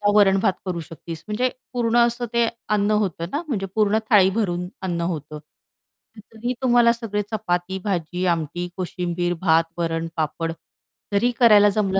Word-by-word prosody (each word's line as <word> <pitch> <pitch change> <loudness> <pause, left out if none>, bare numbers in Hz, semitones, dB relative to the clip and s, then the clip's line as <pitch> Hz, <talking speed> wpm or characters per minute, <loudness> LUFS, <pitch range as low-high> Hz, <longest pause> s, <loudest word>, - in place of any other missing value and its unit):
वरण-भात 195 -2 +4
करू 180 -2 -2
शकतीस, 165 +1 -9
म्हणजे 245 +4 0 0.2
पूर्ण 235 -1 +1
असं 240 +1 -3
ते 235 -1 +3 0.3
अन्न 205 +1 +1
होतं 170 -3 -3
ना, 290 - -1
म्हणजे 200 -8 -2
पूर्ण 215 0 +3
थाळी 195 -4 +6
भरून 180 -4 -1 0.2
अन्न 170 -2 -2
होतं. 150 -1 -6 0.9
तरी 240 +3 -3
तुम्हाला 240 -2 +5
सगळे 220 -3 -3
चपाती, 190 -3 -1
भाजी, 180 -2 -2
आमटी, 175 0 -1
कोशिंबीर, 175 -1 -2
भात, 165 -2 +4
वरण, 165 -1 -1
पापड 165 +1 -1 0.6
तरीही 240 +5 +3
करायला 210 -4 +7
जमलं 195 -2 +1
190 Hz, 145 wpm, -23 LUFS, 170-220 Hz, 0.9 s, करायला